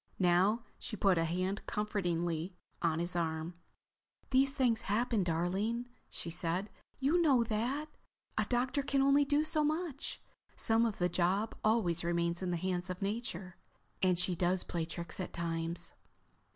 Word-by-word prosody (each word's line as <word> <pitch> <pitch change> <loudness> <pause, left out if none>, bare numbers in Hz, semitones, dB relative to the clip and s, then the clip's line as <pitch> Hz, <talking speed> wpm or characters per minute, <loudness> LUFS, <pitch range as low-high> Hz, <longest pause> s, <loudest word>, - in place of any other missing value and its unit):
Now 190 +5 +3 0.2
she 215 - -5
put 195 -3 +3
a 165 - +2
hand 185 +4 -1
comfortingly 175 -4 -1 0.3
on 165 -2 +2
his 175 +1 -1
arm. 160 0 -1 0.8
"These 270 +1 +5
things 250 -5 +2
happen, 225 0 +2
darling," 190 +8 -1 0.2
she 170 - -4
said. 175 +4 -2 0.3
"You 295 +6 +3
know 270 -7 +5
that. 240 +7 -1 0.5
A - - +1
doctor 255 +3 +1
can 275 -1 +1
only 280 +1 +5
do 290 +2 +2
so 310 -1 +2
much. 310 -2 -2 0.4
Some 225 0 +3
of 215 - -4
the 180 - +2
job 185 +5 +1
always 210 -7 +2
remains 170 0 0
in 185 - -1
the 175 - 0
hands 180 +1 -2
of 185 +2 -4
Nature. 195 -4 -3 0.4
And 185 -2 +3
she 180 +1 +3
does 180 +2 +2
play 170 -2 -2
tricks 170 +1 -5
at 185 - -4
times." 165 0 -3
190 Hz, 155 wpm, -33 LUFS, 175-240 Hz, 0.8 s, These